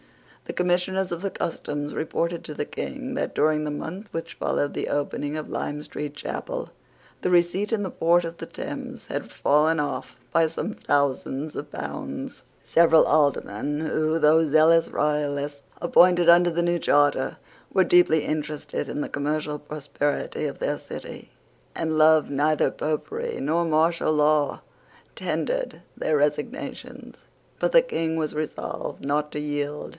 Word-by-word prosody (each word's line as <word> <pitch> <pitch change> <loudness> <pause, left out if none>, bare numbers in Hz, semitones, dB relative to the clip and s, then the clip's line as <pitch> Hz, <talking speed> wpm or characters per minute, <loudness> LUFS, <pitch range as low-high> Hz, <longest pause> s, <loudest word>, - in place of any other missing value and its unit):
The - - -5
Commissioners 180 +1 +1
of 170 - -5
the 195 - -1
Customs 145 -4 -4
reported 170 +2 -2
to 155 - -6
the 145 - -3
King 265 - -5
that, 270 - -2
during 155 0 +2
the 150 - -2
month 180 +8 -6
which 165 - -5
followed 145 - -1
the - - -3
opening 145 +1 -2
of 155 - -5
Lime 145 +1 -3
Street 150 -1 -6
Chapel, - - -5 0.5
the - - 0
receipt 180 +4 +2
in 220 -3 +1
the 185 - -3
port 170 +1 +3
of 165 0 -6
the - - -7
Thames - - -7
had - - -4
fallen 155 +3 +3
off 145 - -3 0.2
by 165 -1 +4
some 165 +6 -4
thousands 140 0 -1
of 145 0 -6
pounds. 75 -1 -6 0.2
Several 165 -1 +5
Aldermen, 145 -2 +1
who, 155 0 0
though 160 +1 +5
zealous 160 +2 +5
royalists 145 -1 -1 0.2
appointed 175 0 +5
under 175 +1 +7
the 170 +1 0
new 175 0 +1
charter, 145 -3 +2 0.3
were 190 - +4
deeply 165 -4 +4
interested 150 -1 -3
in - - -3
the - - -2
commercial 150 +1 -2
prosperity 145 -1 -2
of - - -7
their - - -1
city, - - -9 0.5
and 160 -1 -1
loved 155 0 +5
neither 150 +2 +2
Popery 445 - -3
nor 160 +4 +1
martial 165 0 +2
law, 150 -1 +2 0.5
tendered - - -2
their 155 - +1
resignations. 150 - -3 0.3
But - - +1
the - - +7
King 165 - -2
was 155 -2 -1
resolved 155 -2 -4
not 150 +1 0
to 150 - -3
yield. 145 0 -3
155 Hz, 150 wpm, -25 LUFS, 145-170 Hz, 0.5 s, under